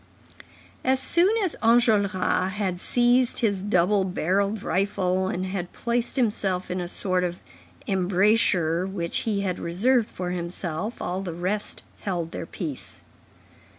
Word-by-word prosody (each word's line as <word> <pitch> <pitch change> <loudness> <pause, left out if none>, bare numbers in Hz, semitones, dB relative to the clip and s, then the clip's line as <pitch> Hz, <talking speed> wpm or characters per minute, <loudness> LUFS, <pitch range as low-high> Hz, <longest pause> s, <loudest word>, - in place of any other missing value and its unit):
As 260 0 +3
soon 345 +7 +4
as 365 - 0
Enjolras 205 -5 +3
had 190 -4 -2
seized 245 +3 +2
his 200 -5 +1
double 195 0 +2
barrelled 195 +3 0
rifle, 185 0 0
and 185 0 -2
had 185 -2 -4
placed 235 0 -1
himself 200 -8 0
in 180 0 -2
a 175 - -4
sort 185 0 0
of 175 0 -3 0.5
embrasure 185 -2 +2
which 175 -3 -2
he 200 -2 0
had 185 -2 -2
reserved 220 +7 +2
for 180 -1 -4
himself, 175 +3 -4
all 185 +2 -2
the 175 -4 -5
rest 190 +5 -2 0.2
held 175 -4 -3
their 165 - -6
peace. 130 - -6
190 Hz, 135 wpm, -25 LUFS, 180-210 Hz, 0.5 s, soon